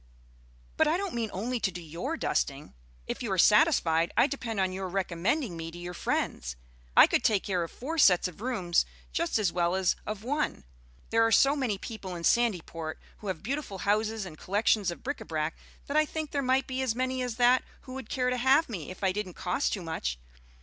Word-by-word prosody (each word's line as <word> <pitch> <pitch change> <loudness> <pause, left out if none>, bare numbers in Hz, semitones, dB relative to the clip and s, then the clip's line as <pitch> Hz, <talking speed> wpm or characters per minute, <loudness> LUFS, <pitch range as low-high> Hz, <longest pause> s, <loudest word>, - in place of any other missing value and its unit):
"But 315 - +4
I 320 +3 +2
don't 390 -2 -3
mean 230 -2 -1
only 235 +6 -2
to 205 - +1
do 180 -1 -7
your 175 - -4
dusting. 140 - -1 0.3
If - - -4
you 230 -5 -3
are - - -1
satisfied, 175 - +4
I - - +7
depend 240 -7 -3
on 190 -1 +1
your 190 0 -4
recommending 190 - -1
me 165 0 -5
to 170 - -10
your 175 0 -6
friends. - - -2 0.4
I - - +11
could - - +1
take 205 -3 +3
care 185 -3 0
of 165 - -3
four 320 +6 -4
sets 185 -9 +6
of 180 +2 -11
rooms 200 -9 +1 0.3
just 335 -5 +1
as 200 -6 +1
well 175 0 +1
as 190 -1 +2
of 215 -1 -4
one. 290 +5 -1 0.5
There 225 0 +4
are 225 - +3
so 275 +6 +5
many 250 -8 -1
people 195 -4 -7
in 170 - -6
Sandyport 170 -8 +1 0.2
who 210 - -8
have 185 -4 -3
beautiful 265 -4 -3
houses 215 +2 0
and 155 -4 -10
collections 205 0 +2
of 170 - -7
bric 285 +3 -3
à - - -10
brac, 155 0 -2 0.3
that 280 - -4
I 310 0 +5
think 310 -1 -4
there 285 - 0
might 260 0 +2
be 260 0 -3
as 250 -4 0
many 255 +1 -1
as 250 -3 -2
that 245 +1 +4 0.2
who 255 - -10
would 265 -4 -7
care 250 -2 0
to 250 - 0
have 265 +5 +4
me 180 -10 -5
if 185 - -9
I 190 - +3
didn't 190 -2 -4
cost 185 +10 0
too 195 - -3
much. 110 - -3
210 Hz, 220 wpm, -29 LUFS, 180-255 Hz, 0.5 s, I